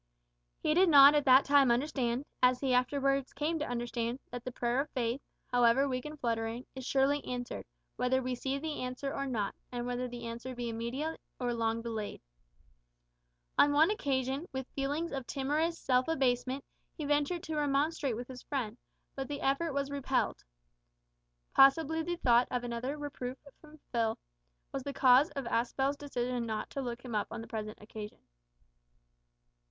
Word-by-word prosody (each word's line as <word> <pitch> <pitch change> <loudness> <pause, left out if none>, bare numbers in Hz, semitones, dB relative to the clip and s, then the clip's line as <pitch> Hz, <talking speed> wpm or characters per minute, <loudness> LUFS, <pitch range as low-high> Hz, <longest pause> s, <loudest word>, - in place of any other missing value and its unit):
He 305 - +1
did 365 +2 +5
not 285 -1 +9
at 295 -1 +2
that 260 0 +7
time 280 -2 +5
understand, 250 0 0 0.2
as 250 0 +5
he 265 -2 +1
afterwards 275 +1 +1
came 310 +3 -1
to 300 - -3
understand, 240 0 -2
that 245 -1 -6
the 255 - -4
prayer 245 +1 0
of 300 - -6
faith 245 +1 -1 0.3
however 245 +3 +4
weak 255 0 -2
and 300 0 -7
fluttering 230 0 -2
is 265 - -7
surely 275 +1 +2
answered, 245 -1 -5 0.3
whether 255 +1 +2
we 255 0 -2
see 265 +2 -2
the 300 +1 -4
answer 255 +2 -3
or 275 - -2
not, 215 -6 -1 0.2
and 240 -1 -3
whether 245 0 -2
the 240 -1 -7
answer 235 +2 -6
be 240 -1 -3
immediate 245 +8 -3 0.2
or 245 -1 0
long 230 0 -1
delayed. 220 -3 -4 1.4
On 290 0 +6
one 315 +6 +5
occasion, 270 -3 -1
with 265 -1 -4
feelings 290 +5 -2
of 270 -3 -4
timorous 300 +5 0
self 255 -3 +2
abasement, 265 -3 0 0.3
he 305 - -3
ventured 295 +4 +1
to 315 - -4
remonstrate 290 -2 +1
with 240 +2 -6
his 255 -1 -9
friend, 245 -5 -3 0.3
but 270 -1 -4
the 290 -1 -5
effort 275 +5 +1
was 280 0 -2
repelled. 270 -2 -1 1.1
Possibly 315 +4 +5
the 345 +2 -2
thought 245 -7 +4
of 250 -1 -2
another 245 +4 -3
reproof 270 -3 -5 0.2
from 310 0 -16
Phil 225 -2 +1 0.5
was 275 - -3
the 280 +2 -5
cause 260 +3 +6
of 275 -2 -3
Aspel's 260 +4 0
decision 250 -4 -3
not 220 -1 -3
to 275 - -3
look 240 -1 -5
him 240 - -6
up 210 -1 0
on 230 0 -6
the 225 - -9
present 215 -1 -5
occasion. 210 0 -9
260 Hz, 170 wpm, -32 LUFS, 240-285 Hz, 1.4 s, not